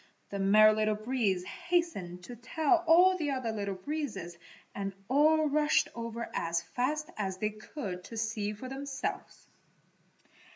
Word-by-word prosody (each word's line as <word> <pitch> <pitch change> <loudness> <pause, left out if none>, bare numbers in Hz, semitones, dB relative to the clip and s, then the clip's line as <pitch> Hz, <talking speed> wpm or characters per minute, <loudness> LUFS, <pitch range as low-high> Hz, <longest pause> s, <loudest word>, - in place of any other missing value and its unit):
The 200 - -3
Merry 215 +2 +6
Little 215 0 +1
Breeze 215 -5 0
hastened 200 - -2
to 245 - -8
tell 315 +8 +1
all 360 +3 +7
the 310 -5 -2
other 255 -4 -1
Little 200 -2 -3
Breezes 195 - -4 0.4
and 195 -1 -4
all 305 +4 +4
rushed 300 +1 +2
over 230 0 -5
as 170 0 0
fast 295 - -2
as 190 -3 -2
they 215 +2 -1
could 210 -4 -7
to 230 - -8
see 220 -2 -1
for 215 +5 -8
themselves. 270 +1 -5
230 Hz, 140 wpm, -31 LUFS, 200-295 Hz, 0.4 s, all